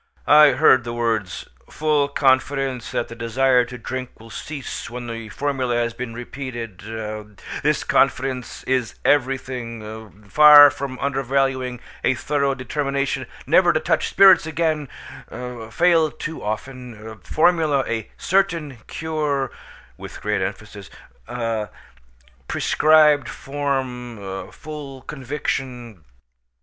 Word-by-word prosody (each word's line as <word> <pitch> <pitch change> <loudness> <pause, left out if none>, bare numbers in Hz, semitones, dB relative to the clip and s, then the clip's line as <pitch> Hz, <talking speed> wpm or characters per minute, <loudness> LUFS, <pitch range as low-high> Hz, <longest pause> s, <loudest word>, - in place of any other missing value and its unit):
I 150 0 +7
heard 130 -3 +5
the 120 0 -5
words 110 -5 -2 0.2
"full 150 -2 +1
confidence 135 -2 +1
that - - -2
the - - -9
desire 125 +2 +2
to 125 +1 -9
drink 130 +2 -6
will 115 0 -14
cease 145 -4 -6
when 120 0 -7
the 115 -2 -6
formula 130 0 -1
has 120 -1 0
been 120 -2 -6
repeated 120 -5 -7 0.8
this - - +1
confidence 130 -1 0
is 130 -3 -1
everything 115 -6 -2
far 150 +4 +9
from 130 -1 -6
undervaluing 135 -2 -1 0.2
a 130 - +2
thorough 140 +1 0
determination 140 +1 -2 0.2
never - - +5
to - - +1
touch - - 0
spirits 190 -5 +6
again 155 -3 -1 0.8
fail 165 +3 +3
too 160 +2 -7
often 110 0 -6
formula 155 - +2
a 110 -2 -3
certain 170 -8 0
cure 150 -5 -2 0.5
(with - - -9
great - - -1
emphasis) - - -6 1.6
prescribed 150 -4 +4
form 125 -8 -4
full 145 -3 -9
conviction." 130 - -5
130 Hz, 110 wpm, -22 LUFS, 120-145 Hz, 1.6 s, far